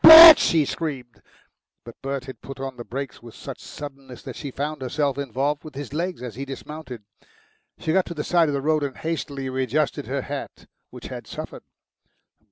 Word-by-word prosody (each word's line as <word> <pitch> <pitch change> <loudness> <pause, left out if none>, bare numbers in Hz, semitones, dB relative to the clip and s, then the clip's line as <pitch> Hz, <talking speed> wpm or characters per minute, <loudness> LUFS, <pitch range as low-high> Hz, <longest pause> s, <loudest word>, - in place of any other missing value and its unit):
"Bert!" 325 -1 +13
she 160 -3 +3
screamed. 135 -7 -5 0.6
But 115 - -12
Bert 135 -1 -3
had 130 -5 -10
put 135 0 -9
on 135 -1 -4
the 120 - -7
brakes 135 +3 -6
with 115 -1 -12
such - - -8
suddenness 135 -3 -9
that - - -7
she 140 - -5
found 145 +2 -4
herself 140 +2 0
involved 140 +2 -1
with 155 -3 -10
his 140 -1 -6
leg 170 -3 -2
as 120 -3 -5
he 135 +6 -5
dismounted. 135 -3 -8 0.7
She 160 - -1
got 190 0 +3
to 170 - -6
the 150 - -2
side 170 -2 +3
of 145 - 0
the 135 - -2
road 155 0 +2
and 140 -2 -3
hastily 145 -4 -3
readjusted 130 +3 -1
her - - -2
hat, - - -6 0.2
which - - -9
had - - -7
suffered. - - -7
140 Hz, 190 wpm, -24 LUFS, 130-155 Hz, 0.7 s, Bert